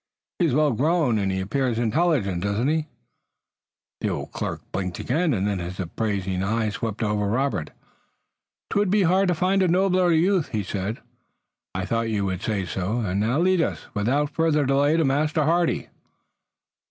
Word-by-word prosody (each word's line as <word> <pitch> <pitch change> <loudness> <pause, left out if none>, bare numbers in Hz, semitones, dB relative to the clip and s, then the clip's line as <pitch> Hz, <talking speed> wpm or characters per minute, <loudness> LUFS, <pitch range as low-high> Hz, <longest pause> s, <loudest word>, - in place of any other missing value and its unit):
He 175 - +3
is 130 - 0
well 150 -1 +3
grown 140 -2 +2
and 100 -1 0
he 95 - -1
appears 120 +4 -1
intelligent, 120 - +1
does 100 +1 -1
he 115 - 0
not?" 160 -1 -1 1.1
The - - -1
old - - -4
clerk - - -4
blinked 90 -2 -3
again, 160 +6 0
and 100 -6 0
then 100 -2 -1
his 90 +2 -6
appraising 95 0 -2
eyes 110 +2 0
swept 115 0 -3
over 105 -1 0
Robert. 125 - -1 1.0
"'Twould 205 -1 +2
be 205 +1 +3
hard 185 +3 +3
to 180 - +2
find 190 +3 +2
a 185 - +3
nobler 185 0 +3
youth," 170 +1 +2
he 105 -2 0
said. 100 +4 -4 0.7
"I 90 0 -2
thought 115 +2 -1
you 105 -3 0
would 95 -1 -2
say 100 -4 -1
so, 95 +6 -2
and 100 -3 -1
now 115 +6 +1
lead 180 +1 +3
us, - - -2
without 135 +8 0
further 150 -1 +2
delay, 140 +3 +3
to 165 - +2
Master 150 +3 +1
Hardy." 170 +2 +1
120 Hz, 175 wpm, -24 LUFS, 100-165 Hz, 1.1 s, He